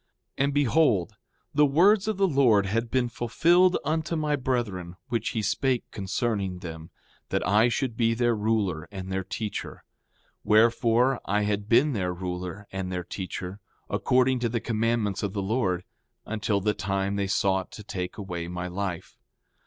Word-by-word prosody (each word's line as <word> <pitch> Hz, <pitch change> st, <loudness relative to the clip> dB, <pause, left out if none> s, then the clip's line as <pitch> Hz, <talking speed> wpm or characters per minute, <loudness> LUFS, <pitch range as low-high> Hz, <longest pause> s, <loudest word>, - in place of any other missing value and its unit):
5:19 -, -, +4 dB
And 140 Hz, -, -1 dB
behold, 140 Hz, -, +2 dB, 0.4 s
the 150 Hz, +1 st, +5 dB
words 190 Hz, +8 st, +4 dB
of 215 Hz, -3 st, -1 dB
the 195 Hz, 0 st, +3 dB
Lord 125 Hz, -, +4 dB
had 115 Hz, +4 st, -1 dB
been 125 Hz, 0 st, +1 dB
fulfilled 170 Hz, +11 st, +3 dB
unto 160 Hz, +2 st, -1 dB
my 150 Hz, -2 st, +1 dB
brethren, 110 Hz, -10 st, -2 dB
which 115 Hz, -3 st, -1 dB
he 110 Hz, -4 st, -2 dB
spake 130 Hz, +2 st, +1 dB
concerning 100 Hz, -1 st, -2 dB
them, 80 Hz, -2 st, -8 dB, 0.4 s
that -, -, -1 dB
I 105 Hz, +5 st, +4 dB
should 120 Hz, -1 st, -1 dB
be 115 Hz, 0 st, +2 dB
their 120 Hz, 0 st, +2 dB
ruler 105 Hz, -7 st, 0 dB
and 95 Hz, -1 st, -6 dB
their 95 Hz, 0 st, -1 dB
teacher. 105 Hz, +3 st, -5 dB, 0.6 s
Wherefore, 115 Hz, +3 st, +3 dB
I 105 Hz, +1 st, +1 dB
had 105 Hz, 0 st, -2 dB
been 135 Hz, +5 st, +4 dB
their 90 Hz, -5 st, -1 dB
ruler 90 Hz, +2 st, -5 dB
and 95 Hz, -1 st, -4 dB
their 90 Hz, -1 st, -3 dB
teacher, 90 Hz, +1 st, -6 dB, 0.3 s
according 130 Hz, 0 st, +2 dB
to 120 Hz, -1 st, 0 dB
the 115 Hz, +1 st, -1 dB
commandments 110 Hz, -3 st, 0 dB
of 100 Hz, -2 st, -2 dB
the 100 Hz, -2 st, -2 dB
Lord, 95 Hz, -4 st, 0 dB, 0.4 s
until 105 Hz, -2 st, -1 dB
the 105 Hz, +2 st, +1 dB
time 95 Hz, +1 st, -1 dB
they 100 Hz, -1 st, -1 dB
sought 95 Hz, -1 st, +1 dB
to 105 Hz, -, -9 dB
take 90 Hz, -3 st, -5 dB
away 90 Hz, -5 st, -5 dB
my 90 Hz, +1 st, -4 dB
life. 90 Hz, -1 st, -5 dB
105 Hz, 165 wpm, -26 LUFS, 95-125 Hz, 0.6 s, the